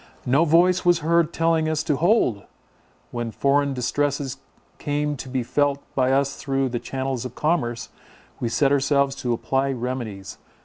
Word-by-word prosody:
No 140 Hz, +7 st, +3 dB
voice 175 Hz, +3 st, +4 dB
was 175 Hz, -1 st, +4 dB
heard 170 Hz, 0 st, +3 dB
telling 165 Hz, -1 st, +1 dB
us 155 Hz, -1 st, -1 dB
to 150 Hz, -, 0 dB
hold! 165 Hz, -, +2 dB, 0.7 s
When 120 Hz, -1 st, -3 dB
foreign 140 Hz, +3 st, +1 dB
distresses 140 Hz, +1 st, -1 dB, 0.4 s
came 145 Hz, 0 st, -1 dB
to 130 Hz, -, -8 dB
be 130 Hz, -1 st, -1 dB
felt 145 Hz, +3 st, +1 dB
by 130 Hz, -1 st, +2 dB
us 140 Hz, +1 st, +1 dB
through 135 Hz, -1 st, -1 dB
the 120 Hz, -1 st, -3 dB
channels 130 Hz, -1 st, -3 dB
of 125 Hz, -1 st, -7 dB
commerce, 125 Hz, -8 st, -1 dB, 0.5 s
we 120 Hz, -, -1 dB
set 135 Hz, +4 st, +2 dB
ourselves 140 Hz, 0 st, +2 dB
to 120 Hz, -, -2 dB
apply 135 Hz, +3 st, 0 dB
remedies. 120 Hz, -6 st, -5 dB
140 Hz, 160 wpm, -23 LUFS, 125-150 Hz, 0.7 s, voice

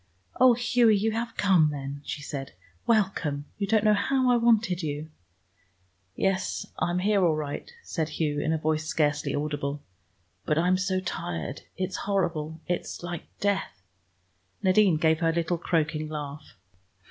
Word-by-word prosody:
"Oh, 255 Hz, -1 st, +7 dB
Hughie, 240 Hz, -2 st, +4 dB
you 220 Hz, +3 st, +1 dB
have 230 Hz, +1 st, -3 dB
come 185 Hz, -6 st, +4 dB
then," 140 Hz, -1 st, -5 dB
she 145 Hz, -, -5 dB
said. 140 Hz, -2 st, -6 dB, 0.3 s
"Welcome; 190 Hz, -10 st, +1 dB
you 200 Hz, -, 0 dB
don't 215 Hz, +1 st, +3 dB
know 215 Hz, -1 st, +5 dB
how 255 Hz, +4 st, +2 dB
I -, -, +5 dB
wanted 225 Hz, -6 st, +3 dB
you!" 150 Hz, 0 st, -4 dB, 1.0 s
"Yes, 195 Hz, -1 st, 0 dB
I'm 175 Hz, +1 st, 0 dB
here 200 Hz, +1 st, +2 dB
all 165 Hz, -3 st, +3 dB
right," 150 Hz, -, -5 dB
said 160 Hz, -2 st, -2 dB
Hugh 150 Hz, -1 st, -1 dB
in 155 Hz, -, 0 dB
a 160 Hz, -, +2 dB
voice 155 Hz, 0 st, 0 dB
scarcely 150 Hz, -2 st, 0 dB
audible. 145 Hz, -1 st, -3 dB, 0.6 s
"But 150 Hz, -, 0 dB
I'm 180 Hz, +3 st, +3 dB
so 185 Hz, 0 st, 0 dB
tired. 85 Hz, -, -4 dB, 0.2 s
It's 190 Hz, 0 st, -2 dB
horrible; 160 Hz, -5 st, -1 dB
it's 175 Hz, 0 st, -3 dB
like 175 Hz, -1 st, -5 dB
death!" 200 Hz, -, -1 dB, 0.8 s
Nadine 190 Hz, -2 st, +4 dB
gave 160 Hz, 0 st, +3 dB
her 165 Hz, -1 st, +2 dB
little 170 Hz, +1 st, -1 dB
croaking 155 Hz, -2 st, 0 dB
laugh. 145 Hz, -4 st, -7 dB
165 Hz, 150 wpm, -27 LUFS, 150-200 Hz, 1.0 s, Oh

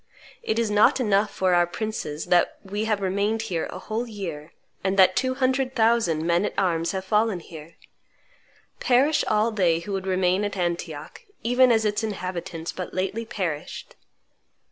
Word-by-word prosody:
It 220 Hz, -, -2 dB
is 230 Hz, -2 st, 0 dB
not 210 Hz, +5 st, +4 dB
enough 210 Hz, -3 st, +2 dB
for 185 Hz, -1 st, 0 dB
our 175 Hz, 0 st, +4 dB
princes 175 Hz, -6 st, -4 dB
that 175 Hz, -1 st, +2 dB
we 205 Hz, +2 st, -3 dB
have 215 Hz, -2 st, 0 dB
remained 200 Hz, +4 st, 0 dB
here 175 Hz, -7 st, -2 dB
a -, -, -8 dB
whole 220 Hz, +5 st, -4 dB
year, 170 Hz, -8 st, -7 dB, 0.3 s
and 190 Hz, +1 st, 0 dB
that 185 Hz, -1 st, +6 dB
two 260 Hz, 0 st, 0 dB
hundred 260 Hz, 0 st, 0 dB
thousand 220 Hz, -9 st, +2 dB
men 170 Hz, +2 st, +2 dB
at -, -, -3 dB
arms 170 Hz, -3 st, +1 dB
have 190 Hz, 0 st, -4 dB
fallen 210 Hz, -1 st, +1 dB
here! 165 Hz, -1 st, -12 dB, 1.0 s
Perish 280 Hz, +5 st, +3 dB
all 215 Hz, +2 st, +2 dB
they 175 Hz, -6 st, +2 dB
who 200 Hz, +4 st, -6 dB
would 190 Hz, 0 st, -3 dB
remain 185 Hz, +1 st, +1 dB
at 205 Hz, -1 st, -3 dB
Antioch, 170 Hz, -4 st, -4 dB, 0.2 s
even 245 Hz, +1 st, +4 dB
as 220 Hz, -1 st, +2 dB
its 210 Hz, +1 st, 0 dB
inhabitants 180 Hz, -5 st, -4 dB
but 185 Hz, -, -7 dB
lately 195 Hz, +5 st, -2 dB
perished!" 180 Hz, -10 st, -5 dB
195 Hz, 165 wpm, -24 LUFS, 175-220 Hz, 1.0 s, that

